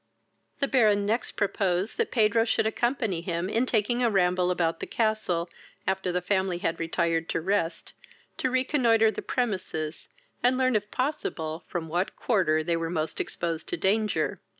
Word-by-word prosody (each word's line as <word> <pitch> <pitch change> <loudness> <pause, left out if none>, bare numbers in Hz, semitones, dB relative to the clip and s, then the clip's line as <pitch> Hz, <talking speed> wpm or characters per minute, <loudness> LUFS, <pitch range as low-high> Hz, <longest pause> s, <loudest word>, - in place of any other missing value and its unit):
The 275 - +3
Baron 210 -6 +3
next 225 +4 -1
proposed 195 -1 0
that 460 - +1
Pedro 225 -1 +3
should 225 - +1
accompany 225 -5 0
him, 170 0 -2
in 230 +5 0
taking 240 +2 +1
a 240 - +3
ramble 180 -3 +2
about 165 -2 0
the - - -5
castle, 215 -7 0 0.4
after 190 -1 0
the 180 0 -1
family 190 -2 +1
had 165 -1 -2
retired 165 0 0
to - - 0
rest, 175 -1 -1 0.4
to 260 - 0
reconnoitre 250 -4 +3
the - - -5
premises, 185 -10 -3 0.3
and 250 +1 +3
learn, 255 -2 +2
if 210 0 0
possible, 175 - -3
from 170 -3 -4
what 175 +4 -1
quarter 165 -9 +1
they 170 +1 0
were 165 0 -2
most 160 -2 -2
exposed 165 -1 -3
to - - -2
danger. 215 +2 +1
195 Hz, 165 wpm, -27 LUFS, 170-225 Hz, 0.4 s, The